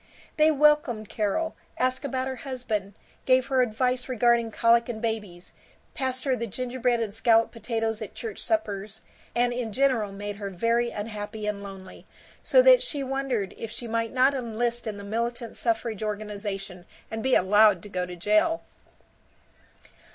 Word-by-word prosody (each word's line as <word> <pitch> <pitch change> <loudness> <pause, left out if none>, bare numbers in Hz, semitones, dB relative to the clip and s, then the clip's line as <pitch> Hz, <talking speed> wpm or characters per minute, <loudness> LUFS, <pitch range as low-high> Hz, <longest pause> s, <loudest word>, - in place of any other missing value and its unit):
They 310 0 +5
welcomed 295 -7 +3
Carol, 230 +10 -1 0.2
asked 255 +2 0
about 260 -2 -2
her 260 -1 -4
husband, 220 -8 -4 0.3
gave 255 0 +5
her 260 -1 +3
advice 250 +2 0
regarding 235 -1 +3
colic 235 +1 +3
in 225 -2 -4
babies, 210 -6 -4 0.4
passed 260 -2 -2
her 265 -2 +1
the 235 -1 -3
gingerbread 250 +1 -1
and 220 -3 -2
scalloped 225 0 +3
potatoes 225 -1 -2
at - - -7
church 445 -2 -6
suppers, 215 -10 -2 0.3
and 245 0 +2
in 240 -2 -3
general 245 -4 +1
made 205 +1 -6
her 200 -1 -4
very 230 +6 +1
unhappy 210 0 -5
and 210 -1 -2
lonely, 195 -2 -10 0.3
so - - +5
that - - +7
she 300 - -2
wondered 265 -6 -2
if 225 - -5
she 235 +1 -6
might 230 0 -1
not 260 +2 +4
enlist 240 -2 -2
in 210 -2 -4
the 200 - -8
militant 235 +3 -3
suffrage 225 -2 -1
organization 205 -3 -5 0.2
and 225 0 -3
be 260 +2 +3
allowed 205 -1 +5
to 205 - -10
go 180 -2 -2
to 180 - -7
jail. 215 - +2
230 Hz, 160 wpm, -26 LUFS, 210-255 Hz, 0.4 s, that